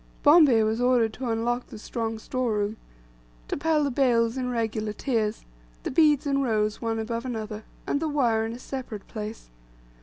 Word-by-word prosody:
Bombay 290 -7 +7
was 220 +2 0
ordered 245 -3 +3
to 250 0 -4
unlock 240 +2 -1
the - - -10
strong 225 +1 -3
store 245 +1 -2
room, 210 +1 -1 0.7
to - - -2
pile 305 +1 +2
the 280 - 0
bales 240 -3 +2
in 255 -1 -2
regular 220 -3 -2
tiers, 220 -3 -1 0.4
the - - -3
beads 300 -1 +4
in 275 -1 +1
rows 215 -4 0
one 225 -1 -1
above 230 +1 -3
another, 220 -4 -5 0.2
and 285 - 0
the 315 0 -1
wire 240 -7 +2
in 225 +1 -3
a - - -7
separate 250 -5 -7
place. 215 - -7
230 Hz, 180 wpm, -26 LUFS, 220-260 Hz, 0.7 s, Bombay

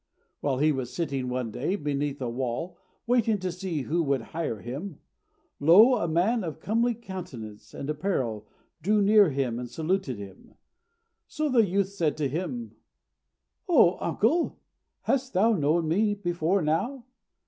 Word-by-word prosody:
While 140 -3 0
he 155 +3 +3
was 130 -4 -3
sitting 140 -7 -2
one 125 -2 -2
day 150 - -1
beneath 145 -3 -2
a - - -1
wall, 130 +8 -3 0.3
waiting 235 -3 +2
to 185 -2 -3
see 175 -5 -3
who 170 +6 0
would 140 -6 0
hire 160 -9 -2
him, 145 - -6 0.6
lo! 190 - +7
a 170 - -1
man 190 +8 +1
of 160 -4 -5
comely 230 +3 +1
countenance 175 - -8
and 140 - -5
apparel 135 - -2 0.3
drew 210 +6 +2
near 205 +1 +6
to - - +1
him 125 -4 -1
and 125 -1 -6
saluted 160 - -1
him. 100 -2 -12 0.7
So 305 -1 -2
the 235 -5 +4
youth 195 +1 +1
said 170 -7 -1
to 150 -2 0
him, 185 - -4 0.9
"O 235 - +5
uncle, 310 +11 +1 0.5
hast 265 -1 0
thou 215 +5 +4
known 160 -1 +1
me 205 +6 +2
before 175 -1 0
now?" 235 - -1
170 Hz, 155 wpm, -27 LUFS, 140-205 Hz, 0.9 s, lo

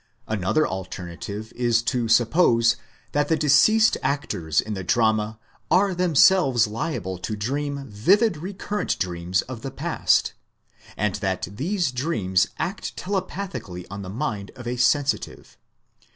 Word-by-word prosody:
Another 110 - +1
alternative 95 +3 -6
is 120 -1 +2
to 120 -1 0
suppose 115 0 +4 0.4
that 145 0 +1
the 160 - +2
deceased 215 - +5
actors 85 - -1
in 110 - -2
the 95 -2 -4
drama 110 +1 +1 0.3
are 185 +3 +3
themselves 170 - +4
liable 105 - -4
to 110 +4 -4
dream 140 +6 -3
vivid 180 - +3
recurrent 200 +5 -3
dreams 90 0 -1
of 125 -3 -8
the 135 - -4
past, - - +1 0.6
and 105 -2 0
that 95 -3 -2
these 165 - -1
dreams 115 - +1
act 195 +3 -4
telepathically 185 - -4
on 100 +1 -6
the 95 - -7
mind 105 -3 -3
of 125 - -10
a 120 +1 -2
sensitive. 140 +3 0
120 Hz, 130 wpm, -24 LUFS, 100-155 Hz, 0.6 s, deceased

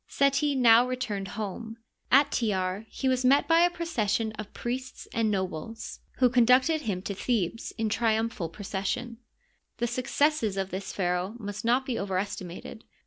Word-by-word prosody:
Seti 280 +1 +2
now 240 -1 +6
returned 215 -6 -3
home. 220 +2 -5 0.3
At 280 +2 +6
Tjar 195 -2 -1
he 265 - -3
was 255 0 +2
met 275 +3 +4
by 330 0 +5
a 350 +1 +5
procession 235 - -1
of 210 -1 -8
priests 255 +2 -5
and 225 -1 +1
nobles, 190 +1 -4 0.2
who 255 - +5
con 245 0 +4
ducted 255 +7 +4
him 200 -9 -3
to 200 - -3
Thebes 225 0 -1
in 225 -1 0
triumphal 220 -5 0
procession. 205 +5 -4 0.6
The 240 - 0
suc 240 +1 -3
cesses 285 -9 +1
of 190 0 -3
this 190 +1 -4
pharaoh 180 +2 -1
must 205 -2 -6
not 245 +3 +2
be 250 -3 -2
overestimated. 195 +1 -4
225 Hz, 160 wpm, -28 LUFS, 200-255 Hz, 0.6 s, now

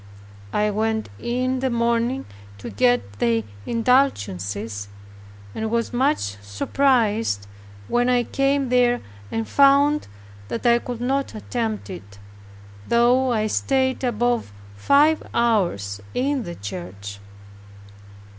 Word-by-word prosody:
I 210 0 +1
went 220 +1 -1
in 255 - -1
the 265 0 0
morning 235 +2 0 0.3
to 100 - -8
get 245 - +1
the 115 -1 +2 0.2
indulgences 105 - 0 0.7
and 220 - -3
was 230 +2 -1
much 250 - 0
surprised 215 - +1 0.4
when 245 +1 +2
I 245 -1 +3
came 275 +1 0
there 245 -1 +3 0.3
and 225 0 -2
found 280 +2 +4 0.4
that 230 - -5
I 235 0 +5
could 240 -1 -6
not 270 0 -1
attempt 220 -1 -3
it; 100 - -10 0.7
though 245 +2 +3
I 215 -2 +1
stayed 260 +4 0
above 240 - 0 0.2
five 290 - +4
hours 170 - +1
in 265 -1 0
the 175 - -6
church. 100 +1 -7
235 Hz, 110 wpm, -23 LUFS, 170-255 Hz, 0.7 s, I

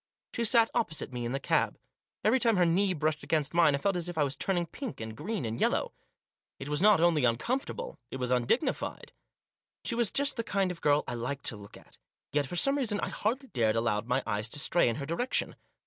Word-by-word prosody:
She 235 - -1
sat 230 0 +4
opposite 160 - -2
me 120 -1 -3
in 120 - -2
the 135 - -1
cab. - - +1 0.5
Every 225 +5 +4
time 230 -4 +3
her 180 - +4
knee 185 +4 +2
brushed 155 0 -1
against 155 -2 0
mine, 165 -4 +5
I - - 0
felt 195 +7 0
as 175 0 -2
if 175 - -7
I 150 - +3
was 140 0 -1
turning 180 -3 -1
pink 250 - -7
and 110 -1 -6
green 185 - -3
and 115 +1 -4
yellow. - - +1 0.6
It 135 - -7
was 150 +2 +1
not 210 -3 +6
only 165 -4 +3
uncomfortable, 260 - -1
it - - -5
was 125 -1 -2
undignified. 125 - 0 0.7
She - - -1
was 230 -3 +1
just 280 -1 +1
the 230 - -1
kind 195 -4 0
of 175 - -9
girl 145 0 +3
I - - -3
like 125 +4 -4
to 115 - -1
look 100 -1 -12
at; - - -20 0.3
yet, 145 -2 +1
for 175 - -6
some 275 +10 +2
reason, 215 -6 0
I - - -2
hardly 255 +5 -2
dared 115 -4 +1
allow 115 -2 +1
my 125 +4 -1
eyes 105 0 -2
to 145 - -2
stray 160 -2 +3
in 115 - -1
her 140 - -5
direction. 205 - -1
160 Hz, 230 wpm, -30 LUFS, 125-215 Hz, 0.7 s, not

